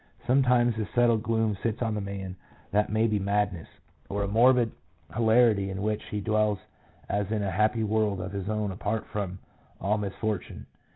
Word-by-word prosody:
Sometimes 125 Hz, -3 st, +3 dB
a 105 Hz, -, -2 dB
settled 120 Hz, -2 st, +4 dB
gloom 110 Hz, -2 st, +1 dB
sits 115 Hz, +1 st, -1 dB
on 110 Hz, -1 st, 0 dB
the 105 Hz, -, -2 dB
man 100 Hz, -2 st, -5 dB, 0.4 s
that 105 Hz, 0 st, +2 dB
may 110 Hz, +1 st, +2 dB
be 105 Hz, -2 st, +1 dB
madness, 100 Hz, -3 st, 0 dB, 0.4 s
or 100 Hz, +1 st, -1 dB
a -, -, -1 dB
morbid 120 Hz, +2 st, +4 dB, 0.4 s
hilarity 110 Hz, -3 st, +4 dB
in 95 Hz, +1 st, -4 dB
which 105 Hz, 0 st, -1 dB
he 105 Hz, -, -4 dB
dwells 105 Hz, 0 st, +1 dB, 0.5 s
as 100 Hz, 0 st, -1 dB
in 105 Hz, -2 st, 0 dB
a 95 Hz, -, -1 dB
happy 110 Hz, +4 st, +2 dB
world 105 Hz, -2 st, +1 dB
of 90 Hz, +1 st, -5 dB
his 100 Hz, 0 st, -4 dB
own 105 Hz, -2 st, -1 dB
apart 105 Hz, +3 st, -2 dB
from 95 Hz, -3 st, -4 dB, 0.4 s
all 105 Hz, +2 st, +1 dB
mis 100 Hz, -2 st, -4 dB
fortune. 110 Hz, -4 st, -3 dB
105 Hz, 180 wpm, -28 LUFS, 100-110 Hz, 0.5 s, settled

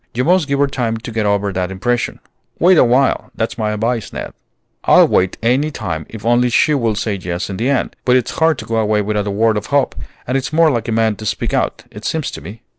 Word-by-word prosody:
You 125 Hz, -, +1 dB
must 175 Hz, 0 st, +3 dB
give 140 Hz, 0 st, 0 dB
her 145 Hz, -, +3 dB
time 120 Hz, -5 st, -2 dB
to 115 Hz, +1 st, -8 dB
get 110 Hz, -2 st, -1 dB
over 100 Hz, -1 st, 0 dB
that 90 Hz, 0 st, -2 dB
impression. 115 Hz, +6 st, -2 dB, 0.4 s
Wait 180 Hz, +2 st, +5 dB
awhile; 130 Hz, +3 st, +2 dB
that's 115 Hz, +1 st, -3 dB
my 110 Hz, -1 st, 0 dB
advice, 110 Hz, +2 st, -2 dB
Ned." -, -, -6 dB, 0.5 s
"I'll -, -, +6 dB
wait 90 Hz, 0 st, +1 dB
any 130 Hz, +6 st, +2 dB
time 80 Hz, -, -5 dB
if 110 Hz, -1 st, -9 dB
only 120 Hz, +1 st, +3 dB
she 150 Hz, +5 st, +3 dB
will 115 Hz, -6 st, 0 dB
say 105 Hz, +1 st, -2 dB
yes 90 Hz, 0 st, -4 dB
in 95 Hz, -, -5 dB
the 120 Hz, +6 st, 0 dB
end. 140 Hz, -, 0 dB
But 125 Hz, -, +3 dB
it's 125 Hz, -3 st, +1 dB
hard 160 Hz, -2 st, +3 dB
to -, -, -7 dB
go 115 Hz, -, -2 dB
away 105 Hz, -1 st, +1 dB
without 105 Hz, 0 st, -1 dB
a -, -, 0 dB
word 110 Hz, +2 st, +2 dB
of 105 Hz, -, -4 dB
hope, 140 Hz, -1 st, +1 dB, 0.3 s
and 125 Hz, -, -2 dB
it's 135 Hz, 0 st, -1 dB
more 160 Hz, 0 st, +4 dB
like 120 Hz, -3 st, -2 dB
a -, -, -2 dB
man 110 Hz, -2 st, +1 dB
to 110 Hz, -, -8 dB
speak 100 Hz, -, -2 dB
out, -, -, -1 dB
it -, -, -11 dB
seems -, -, -2 dB
to -, -, -8 dB
me." 105 Hz, +9 st, -10 dB
115 Hz, 250 wpm, -17 LUFS, 105-130 Hz, 0.5 s, I'll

